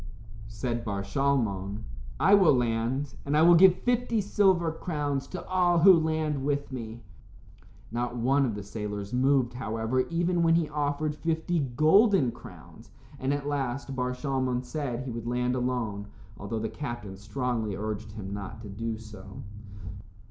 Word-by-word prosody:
Said 115 +1 -3
Bar 100 -3 -3
Shalmon, 100 -4 -1 0.4
"I - - +5
will 190 -8 +6
land, 125 +3 -1
and 145 +2 0
I 155 - +5
will 175 +1 +8
give 180 +1 +6
fifty 245 -2 +1
silver 190 -4 +2
crowns 145 -4 -3
to 180 -1 -7
all 180 -2 +3
who 185 +3 +8
land 155 -4 0
with 140 0 -1
me." 115 -2 -7 0.9
Not 120 +1 -2
one 135 +4 +2
of 110 - -3
the 105 - -6
sailors 105 0 -5
moved, 130 -1 +2
however, 115 0 -2
even 175 +1 +1
when 165 -1 +4
he 165 -2 +2
offered 150 0 -1
fifty 165 +1 -1
golden 155 - +4
crowns, - - -14 0.3
and 130 +1 -1
at 145 0 -2
last 135 -1 -2
Bar 125 0 -1
Shalmon 130 -2 -1
said 130 -4 -3
he 130 - -5
would 115 0 -6
land 125 +1 0
alone, 120 -5 -2 0.3
although 100 +3 -5
the 110 0 -2
captain 120 -8 -6
strongly 110 +1 -3
urged 110 +1 -5
him 100 -3 -6
not 100 +1 -6
to 105 - -8
do 110 +3 -4
so. 105 -3 -11
130 Hz, 155 wpm, -28 LUFS, 115-155 Hz, 0.9 s, will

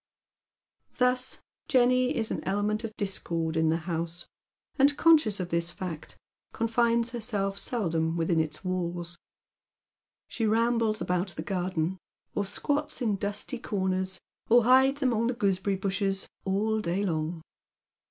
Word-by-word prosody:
Thus 250 0 +1 0.2
Jenny 255 -1 +3
is 225 -2 -1
an - - -3
element 205 +3 0
of 220 -1 -6
discord 170 -5 -2
in 160 0 +3
the 160 - +2
house, 170 0 -3 0.5
and, 285 +1 +5
con 330 -1 +7
ecious 215 -8 -2
of 180 -1 -3
this 170 0 0
fact, 175 -3 -7 0.4
confines 230 +1 +1
herself 210 -4 -2
but 200 - -8
seldom 165 -8 -1
within 165 0 +1
its 155 +3 -3
walls. 175 -1 -3 1.1
She 225 - -1
rambles 230 0 +2
about 180 0 -1
the 155 - -4
garden, 180 -1 -1 0.3
or 205 -1 -1
squats 290 +8 -1
in 215 -4 +2
dusty 205 +5 -3
corners, 190 -3 -1 0.3
or 240 +1 +6
hides 265 +4 +5
among 230 -3 +2
the 245 - -1
gooseberry 195 -2 +1
bushes 195 0 -1 0.2
all 210 +3 +1
day 180 +2 -1
long. 160 -1 -2
200 Hz, 140 wpm, -28 LUFS, 175-230 Hz, 1.1 s, con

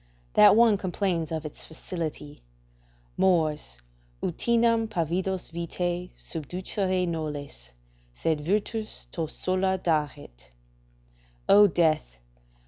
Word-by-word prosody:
That 105 - +7
one 225 -2 +5
complains 180 -4 -1
of 160 -1 -3
its 150 - -7
facility: 160 -3 -6 0.8
"Mors! 160 -5 +1 0.5
utinam 230 +4 +2
pavidos 180 +1 -2
vitae 175 +1 -3
subducere 180 +3 -2
nolles. 145 - -5 0.4
Sed 150 - -1
virtus 210 +6 -2
to 165 -2 -3
sola 185 +3 0
daret!" 150 - -3 1.0
["O 205 +1 +8
death! 155 - +1
170 Hz, 90 wpm, -27 LUFS, 155-190 Hz, 1.0 s, O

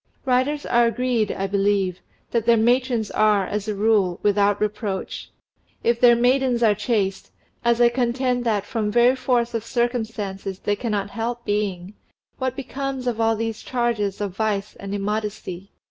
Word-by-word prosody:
Writers 265 +3 +1
are 240 -1 +3
agreed, 230 -2 0
I 195 - -2
believe, 195 -2 +1 0.3
that 230 -1 0
their 235 -1 +6
matrons 240 -1 +1
are, 210 -2 +3
as 210 +2 -3
a 210 - -2
rule, 200 -4 +2
without 205 0 +3
reproach. 210 -2 -3 0.5
If 235 0 +2
their 240 -1 +7
maidens 245 0 +2
are 215 -2 +5
chaste, 205 -2 -1 0.3
as 235 0 +2
I 240 -1 +6
contend 245 0 0
that 210 -3 0
from 220 -2 -2
very 240 +3 +4
force 245 -2 0
of 230 -2 -2
circumstances 220 -6 -2
they 205 +1 -1
cannot 205 -3 -2
help 235 +1 -4
being, 200 -2 -2 0.5
what 260 -1 -1
becomes 275 -1 -4
of 235 -2 -1
all 225 0 +3
these 225 0 -3
charges 235 -5 -1
of 200 -3 -3
vice 210 -1 -1
and 200 0 -5
immodesty? 205 -2 -4
225 Hz, 160 wpm, -23 LUFS, 205-240 Hz, 0.5 s, their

